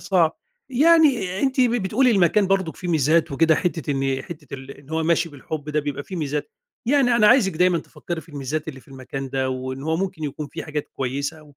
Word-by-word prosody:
صعب، 170 -4 +2 0.3
يعني 275 - +4
أنتِ 265 -1 +1
بتقولي 240 +1 +3
المكان 195 0 +3
برضك 190 -4 0
فيه 180 - -6
ميزات 160 0 +2
وكده 160 +3 +4
حتّة 165 -3 -2
إن 135 -1 0
حتّة 150 -4 -9
ال 135 0 -9
إن 140 +1 -14
هوّ 160 0 0
ماشي 165 +1 +2
بالحب 145 +1 -7
ده 150 0 +1
بيبقى 145 -1 -4
في 185 - -7
ميزات، 150 - -3 0.4
يعني 255 -3 +3
أنا 215 -2 +5
عايزِك 210 -4 +5
دايمًا 180 0 +3
تفكّري 170 +1 -6
في 160 - -20
الميزات 145 +1 -4
اللي 135 -4 -7
في - - -24
المكان 135 0 -6
ده 130 -1 0
وإن 130 +1 -4
هوّ 160 +2 0
ممكن 180 -4 -3
يكون 145 +1 -4
في - - -7
حاجات 150 -1 -4
كويّسة، 140 +4 -3
160 Hz, 200 wpm, -23 LUFS, 140-190 Hz, 0.4 s, أنا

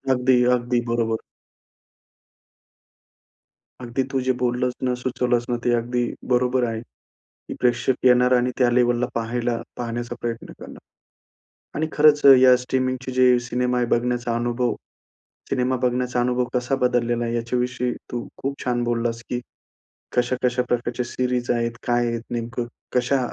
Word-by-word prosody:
अगदी-अगदी, 125 -1 +2
बरोबर. 115 -1 0 2.6
अगदी 120 +2 -2
तू 135 - 0
जे 130 - +3
बोललंस 125 0 0
ना, 125 -1 +1
सुचवलंस 125 -1 -1
ना, 120 - 0
ते 120 - +2
अगदी 120 +1 -1 0.3
बरोबर 125 +1 +2
आहे. 115 -1 -3 0.5
की - - -11
प्रेक्षक 125 +1 +2
येणार 125 0 +5
आणि 125 +1 +1
त्या 125 -2 +4
लेव्हलला 120 0 +2
पाहायला 115 +1 -1 0.2
पाहण्याचा 120 0 -4
प्रयत्न 115 -1 -4
करणार. - - -10 1.0
आणि 155 +2 0
खरंच 150 -1 +5
अ, - - +10
या 130 0 +7
स्ट्रीमिंगची 130 +1 -2
जी 125 -1 +4
सिनेमा 125 0 0
आहे, 120 - +2
बघण्याचा 120 0 0
अनुभव 120 0 0 0.8
सिनेमा 130 0 +1
बघण्याचा 125 0 0
अनुभव 125 0 +1
कसा 125 +2 0
बदललेला 120 -1 +1
आहे? 115 0 -2
याच्याविषयी 125 +1 -1 0.2
तू 120 -1 -4
खूप 140 +1 -2
छान 120 -1 0
बोललास 115 -1 -1
की 125 - -1 0.8
कशा-कशा 125 0 +1
प्रकारच्या 120 0 -1
सीरीज 125 0 -1
आहेत, 120 -1 0 0.2
काय 120 0 +2
आहेत 115 -1 -2
नेमकं, 120 0 -3 0.3
कशा 125 +2 +2
125 Hz, 135 wpm, -23 LUFS, 120-125 Hz, 2.6 s, अ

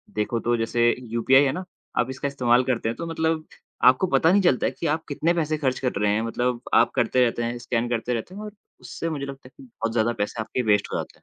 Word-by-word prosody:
देखो 110 +2 -1
तो 120 +1 +1
जैसे 120 +1 +2 0.2
यूपीआई 130 +4 +4
है 135 - +2
ना, 185 +5 -5 0.3
आप 125 +1 +1
इसका 130 +2 -3
इस्तेमाल 125 -3 +2
करते 120 -3 -1
हैं 115 - -3
तो 170 - -4
मतलब 160 -1 -1 0.4
आपको 130 +9 +5
पता 165 -1 +3
नहीं 200 +1 +4
चलता 155 -9 +2
कि 165 - -4
आप 155 +2 -1
कितने 160 +4 0
पैसे 155 -2 -1
खर्च 130 -4 -1
कर 125 - 0
रहे 105 - +3
हैं। 110 - +1
मतलब 120 +1 -1
आप - - +5
करते 125 -1 +3
रहते 120 0 -1
हैं, 120 +1 -2
स्कैन 120 0 -2
करते 120 +1 -1
रहते 120 - -5
हैं 210 - -7
और 210 -1 -7 0.3
उससे 165 - -5
मुझे 145 -3 -4
लगता 135 -1 -9
है 130 - -18
कि - - -13
बहुत 115 -2 -5
ज़्यादा 120 0 +1
पैसे 110 +2 -4
आपके 125 - -2
वेस्ट 105 -1 +2
हो - - 0
जाते - - -6
हैं। - - -38
125 Hz, 255 wpm, -24 LUFS, 120-155 Hz, 0.4 s, आपको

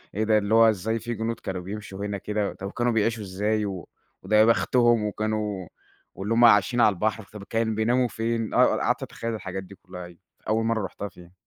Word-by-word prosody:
إيه 110 - 0
ده 110 0 +3
اللي 105 +1 0
هُو 115 0 +7
إزاي 110 +2 -1
في 120 +2 -4
جنود 115 +1 -3
كانوا 95 -1 -5
بيمشوا 100 +1 -6
هنا 100 -1 -3
كده! 105 +1 -2
طب 100 +1 -7
كانوا 120 0 0
بيعيشوا 115 0 0
إزاي! 105 +3 -1
و 95 -5 -6 0.4
وده 105 +3 0
يا 110 +1 +7
بختُهم 115 +2 +3
وكانوا 105 -3 -2 0.5
واللي 100 +4 -2
هُم 120 +1 +6
عايشين 115 +2 +5
على 105 - +5
البحر، 110 +3 -1
طب 105 -2 -8
كان 115 +1 -1
بيناموا 120 +3 +2
فين؟ 115 0 -2
آه - - +6
ق - - -2
قعدت - - 0
أتخيّل 115 0 -5
الحاجات 95 -2 -5
دي 100 +1 -13
كلّها 90 -1 -10
أيوه، 85 -1 -15 0.3
أول 110 +1 +1
مَرّة 110 -3 0
رُحتها 100 +2 -6
فيها. 90 -2 -16
105 Hz, 215 wpm, -25 LUFS, 100-115 Hz, 0.5 s, هُو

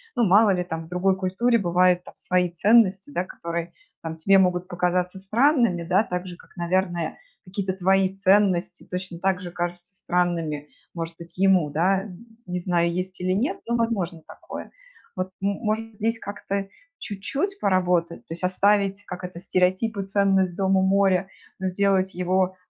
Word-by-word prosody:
Ну 240 - +2
мало 205 +2 +6
ли, 180 -2 0
там, 165 -2 -5
в - - -14
другой 185 +2 +1
культуре 195 +6 +1
бывают 180 -2 +2
там - - -12
свои 180 0 0
ценности, 205 - +3
да, 185 -9 -1
которые 170 -1 -5 0.3
там 160 -1 -5
тебе 195 +5 +4
могут 180 -1 +2
показаться 180 +1 -1
странными, 230 - +2
да, 185 +5 +3
так 180 +1 -4
же, 175 -1 -8
как, - - -20
наверное, 175 -2 -1 0.3
какие-то 190 0 -3
твои 190 0 +2
ценности 190 -2 +2
точно 180 -1 -5
так 190 0 0
же 175 -1 -7
кажутся 175 +2 -5
странными, 170 -6 -1 0.2
может 165 -1 -5
быть, 170 0 -10
ему, 190 -5 +4
да. 185 +6 +1 0.4
Не 180 -1 -3
знаю, 175 -1 +1
есть 185 +1 -4
или 185 +1 0
нет, 280 - -1
но 235 - +1
возможно 200 -8 -1
такое. - - -9 0.5
Вот, 185 0 -2
может, 215 +2 -2
здесь 225 +2 0
как-то 200 -1 -4 0.3
чуть-чуть 275 - -3
поработать: 180 - +1
то - - -5
есть 170 - -9
оставить, 200 +2 +2
как 180 0 -7
это, 180 -1 -7
стереотип 185 +4 +1
и 195 - -2
ценность- 195 -2 +2
дом 195 0 +2
у - - +3
моря, 190 -1 +3 0.3
но 190 - -1
сделать 190 0 +1
его, 185 +1 0
185 Hz, 165 wpm, -24 LUFS, 175-195 Hz, 0.5 s, мало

